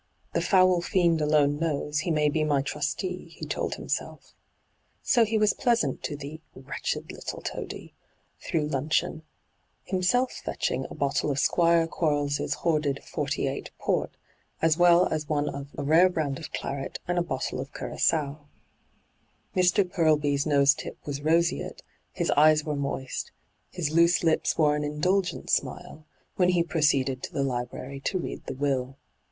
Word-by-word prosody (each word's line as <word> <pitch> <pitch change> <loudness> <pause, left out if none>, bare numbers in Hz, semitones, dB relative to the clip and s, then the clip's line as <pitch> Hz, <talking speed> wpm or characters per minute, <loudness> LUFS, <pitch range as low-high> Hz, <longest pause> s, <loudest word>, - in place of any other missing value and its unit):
' - - -40
The - - +1
foul 185 -2 +4
fiend 170 -3 +2
alone 150 -1 +3
knows, 150 -2 -1
he 165 - -2
may 150 -2 +2
be 155 +1 +1
my 145 -3 +1
trustee,* 170 +6 -3
he - - -6
told - - -2
himself. - - -5 0.7
So 240 -3 +4
he 220 0 0
was 215 -1 +3
pleasant 240 -3 +1
to 150 - -3
the 145 +2 -8
' - - -39
wretched 130 - -4
little - - -6
toady - - -6 0.2
' - - -40
through 155 -2 0
luncheon, 150 +2 -1 0.6
himself 200 +8 +1
fetching 130 +1 -3
a - - -9
bottle 140 +1 0
of 140 - -1
Squire 170 +3 +3
Quarles' 145 -3 0 0.2
hoarded 150 -4 0
'48 - - -3
port, - - 0 0.5
as 165 -1 +3
well 175 +1 +6
as 155 -2 -3
one 150 -1 0
of 140 0 -5
a 145 - -3
rare 165 +6 +5
brand 150 -6 -2
of 160 -1 -8
claret 135 -1 -4
and 175 0 +1
a - - +2
bottle 135 -6 -3
of 135 +2 -6
curagoa. 150 -2 -1 1.2
Mr. 185 +1 +3
Purlby's 150 -5 +2
nose 140 -1 +5
tip - - -8
was 145 -1 -4
roseate, 165 +3 0 0.3
his - - -1
eyes 150 +1 +5
were 150 -1 -2
moist, 140 -2 -4 0.4
his 160 -5 -3
loose 170 +2 +4
lips 160 -1 +2
wore 150 -2 +4
an 150 - -2
indulgent 180 +6 0
smile, 155 0 -2 0.3
when 180 -1 +4
he 175 -2 +3
proceeded 140 -6 +1
to - - -6
the 140 -3 -1
Ubrary 130 +1 -4
to 190 - 0
read 180 - -5
the - - -4
will. 135 -1 -1
155 Hz, 160 wpm, -27 LUFS, 140-170 Hz, 1.2 s, well